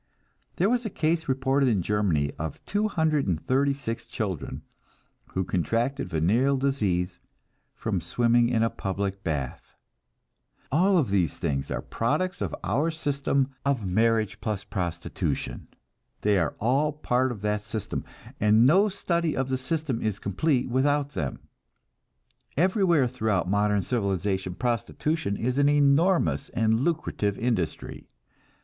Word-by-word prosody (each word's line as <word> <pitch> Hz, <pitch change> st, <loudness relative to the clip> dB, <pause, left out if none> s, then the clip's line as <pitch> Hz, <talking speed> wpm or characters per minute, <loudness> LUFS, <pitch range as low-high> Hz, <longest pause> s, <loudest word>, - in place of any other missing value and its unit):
There 185 Hz, -, +2 dB
was 245 Hz, +2 st, +1 dB
a 220 Hz, -, -3 dB
case 160 Hz, -3 st, 0 dB
reported 135 Hz, +1 st, +2 dB
in 100 Hz, -6 st, +1 dB
Germany 85 Hz, -8 st, +1 dB
of 80 Hz, -2 st, -5 dB
236 140 Hz, -, 0 dB
children 95 Hz, -, -4 dB, 0.7 s
who 95 Hz, -, 0 dB
contracted 115 Hz, -, -1 dB
venereal 115 Hz, -, +2 dB
disease 100 Hz, -10 st, 0 dB, 0.6 s
from -, -, -2 dB
swimming 120 Hz, 0 st, +2 dB
in 115 Hz, -2 st, +2 dB
a 115 Hz, -, +1 dB
public 100 Hz, 0 st, -3 dB
bath. 70 Hz, -6 st, -4 dB, 1.0 s
All 180 Hz, +3 st, +4 dB
these 95 Hz, -, 0 dB
things 70 Hz, -1 st, -2 dB
are -, -, -3 dB
products 180 Hz, +11 st, -1 dB
of -, -, -2 dB
our 130 Hz, -, +1 dB
system 140 Hz, -3 st, 0 dB
of 135 Hz, -6 st, 0 dB
marriage 110 Hz, +2 st, +1 dB
plus 105 Hz, -3 st, -2 dB
prostitution. 85 Hz, -3 st, -3 dB, 0.5 s
They 105 Hz, -2 st, +3 dB
are 80 Hz, -4 st, -1 dB
all 135 Hz, +7 st, +2 dB
part 130 Hz, -3 st, 0 dB
of 110 Hz, -5 st, -7 dB
that 105 Hz, 0 st, 0 dB
system, 105 Hz, 0 st, -4 dB, 0.4 s
and 105 Hz, +3 st, +5 dB
no 190 Hz, +10 st, +5 dB
study 170 Hz, -4 st, -1 dB
of 130 Hz, 0 st, -1 dB
the 130 Hz, -, 0 dB
system 135 Hz, -2 st, -2 dB
is 110 Hz, -3 st, -1 dB
complete 125 Hz, -, 0 dB
without 140 Hz, +3 st, +1 dB
them. 70 Hz, -, -4 dB, 1.2 s
Everywhere 175 Hz, -, +3 dB
throughout 110 Hz, -7 st, 0 dB
modern 105 Hz, 0 st, +2 dB
civilization 95 Hz, -5 st, -1 dB
prostitution 120 Hz, -, -1 dB
is 125 Hz, +4 st, -1 dB
an 145 Hz, 0 st, +5 dB
enormous 145 Hz, +5 st, +3 dB
and 110 Hz, 0 st, +2 dB
lucrative 135 Hz, -9 st, -1 dB
industry. 115 Hz, -9 st, -2 dB
120 Hz, 125 wpm, -26 LUFS, 100-145 Hz, 1.2 s, and